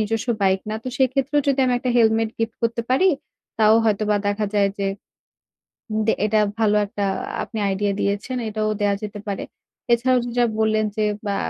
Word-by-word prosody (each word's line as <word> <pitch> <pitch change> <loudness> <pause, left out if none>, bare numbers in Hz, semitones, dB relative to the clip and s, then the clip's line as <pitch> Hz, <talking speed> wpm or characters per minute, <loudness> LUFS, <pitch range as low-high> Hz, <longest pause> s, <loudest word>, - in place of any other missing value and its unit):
নিজস্ব 225 +2 -2
বাইক 190 0 +3
না। 215 - -2
তো - - -3
সেক্ষেত্রেও 270 +2 +2
যদি 275 - +2
আমি 250 -1 +2
একটা 250 0 -2
হেলমেট 225 -1 +3
গিফট 225 0 -2
করতে 230 0 0
পারি 320 +9 +4 0.5
তাও 215 0 +6
হয়তোবা 210 -1 +2
দেখা 205 +1 0
যায় 200 -1 +3
যে 200 - -1 1.1
উম 215 - 0
দে - - +4
এটা 215 0 +2 0.2
ভালো 210 -1 +3
একটা 200 0 -3 0.4
আপনি 225 - -7
আইডিয়া 200 +1 0
দিয়েছেন। 205 +6 -1
এটাও 215 0 -1
দেয়া 205 -1 +2
যেতে 210 0 -6
পারে। 200 - -3 0.5
এছাড়াও 250 +2 +3
যে - - -4
যা 240 - +4
বললেন, 215 0 +2
যে 215 - +2 0.2
বা 200 -1 -1
215 Hz, 185 wpm, -22 LUFS, 205-235 Hz, 1.1 s, তাও